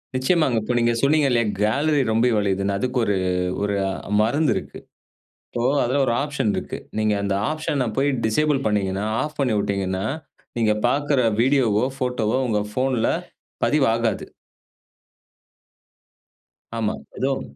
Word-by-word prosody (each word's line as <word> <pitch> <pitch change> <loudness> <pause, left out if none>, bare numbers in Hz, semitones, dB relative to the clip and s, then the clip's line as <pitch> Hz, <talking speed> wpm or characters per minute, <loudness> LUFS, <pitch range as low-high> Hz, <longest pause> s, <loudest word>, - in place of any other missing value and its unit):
நிச்சயமாங்க. 130 -1 +2
இப்ப 115 +4 -2
நீங்க 120 0 +3
சொன்னீங்கல்லயா 140 -5 +3 0.2
கேலரி 140 +7 +2
ரொம்பி 115 +3 +3
வழியுதுன்னு, 100 -1 0
அதுக்கு 125 +4 -2
ஒரு 100 - +1 0.5
ஒரு 100 0 0 0.5
மருந்து 140 +8 +2
இருக்கு. - - -6 0.7
இப்போ 120 - -4 0.2
அதில 130 +4 0
ஒரு 120 - +1
ஆப்ஷன் 145 -7 -1
இருக்கு. - - -4 0.2
நீங்க 110 -1 +2
அந்த 100 -1 0 0.2
ஆப்ஷன்ன 150 -4 -1
போயி 140 +2 +3 0.2
டிசேபிள் 145 +6 +2
பண்ணீங்கன்னா 100 -1 0 0.2
ஆஃப் 150 0 -6
பண்ணி 130 -5 +1
விட்டீங்கன்னா, 95 -1 -1 0.5
நீங்க 110 -2 +3
பார்க்கிற 145 +1 +1 0.2
வீடியோவோ, 125 -4 +3
போட்டோ 125 -3 -1
வோ 130 - +1
உங்க 105 -3 +1
போன்ல 130 -3 +1 0.6
பதிவாகாது. 115 -7 +1 2.5
ஆமா. 110 -2 0 0.2
ஏதும் 135 0 0
120 Hz, 125 wpm, -22 LUFS, 105-140 Hz, 2.5 s, நீங்க